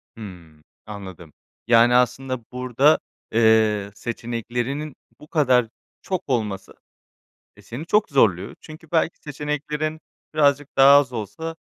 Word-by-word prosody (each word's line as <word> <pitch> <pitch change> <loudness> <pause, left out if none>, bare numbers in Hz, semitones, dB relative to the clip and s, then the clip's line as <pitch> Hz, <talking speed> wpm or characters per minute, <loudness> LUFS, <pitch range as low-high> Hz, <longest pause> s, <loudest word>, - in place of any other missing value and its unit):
Hımm. 85 -8 -12 0.2
Anladım. 95 -6 -10 0.3
Yani, 120 +1 +5
aslında 125 +1 +1
burada, 130 +4 +2 0.3
eee, 110 -2 +3
seçeneklerinin 120 +5 -4 0.2
bu 150 - -15
kadar 130 -7 +2 0.3
çok 185 -2 -3
olması, 105 -6 -2 0.8
eee, - - -17
seni 135 +8 -8
çok 210 +3 +2
zorluyor 100 -8 +2
çünkü 155 0 -13
belki 165 0 0
seçeneklerin 150 +1 -4 0.3
birazcık 145 -1 +2
daha 140 +1 +8
az 130 -3 -1
olsa, 160 +10 -6
125 Hz, 115 wpm, -22 LUFS, 110-150 Hz, 0.8 s, daha